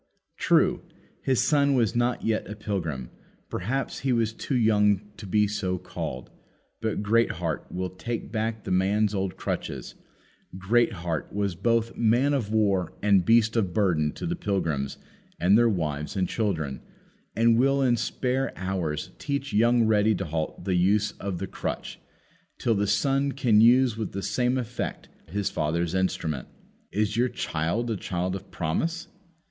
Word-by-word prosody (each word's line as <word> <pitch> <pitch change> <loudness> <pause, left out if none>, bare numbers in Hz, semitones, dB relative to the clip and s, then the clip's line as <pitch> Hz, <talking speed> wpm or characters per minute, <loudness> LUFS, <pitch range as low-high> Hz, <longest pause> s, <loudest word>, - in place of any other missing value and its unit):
True, - - +3 0.4
his 130 -2 +2
son 140 -2 +3
was 115 -2 +2
not 120 +1 +1
yet 110 -1 -1
a 105 - -5
pilgrim; 85 - -4 0.4
perhaps 130 +9 -2
he 135 - 0
was 115 -2 +1
too 130 - -3
young 105 -3 +3 0.2
to 105 - -8
be 105 +3 +3
so 100 -3 -2
called; 75 -7 -6 0.5
but 110 -2 -1
Greatheart 100 -7 0
will 90 0 -3
take 115 +4 -5
back 110 -1 -2
the - - -5
old 90 - +4
man's 105 +2 +1 0.2
crutches - - -4 0.6
Greatheart 95 -6 0
was 100 -2 -1
both 115 +5 0
man 120 +5 +3
of 115 -7 -1
war 100 -5 +1
and 100 -4 +4
beast 115 0 +4
of 95 -6 0
burden 85 -8 +2
to - - -6
the 175 0 -1
pilgrims 85 - -2 0.4
and 90 +4 +5
their 120 +1 +5
wives 75 -6 -2
and 95 -2 +1
children 80 - -2 0.5
and 115 +1 +4
will 135 +1 +3
in 125 -2 +4
spare 125 +3 -1
hours 90 -3 -3
teach 140 -1 -3
young 115 +2 +4
Ready 110 0 +3
to 95 - -3
halt 80 +2 -4
the 95 - 0
use 100 +4 +3
of 100 -2 -3
the - - -3
crutch, - - -5 0.6
till 115 - +1
the 105 -1 0
son 135 +6 +1
can 120 -6 +4
use 120 0 +5
with 110 -3 -4
the 100 0 -4
same 125 +1 +1
effect 120 -1 -4 0.2
as 85 - -12
his 100 -1 0
father 80 +2 0
his 85 - -2
father's - - -8
instrument. 80 -7 -1 0.4
Is 105 +1 0
your 125 +2 +3
child 85 +10 -2
a - - 0
child 90 +1 -2
of 95 +1 -8
promise? 165 - -2
105 Hz, 165 wpm, -26 LUFS, 90-120 Hz, 0.6 s, and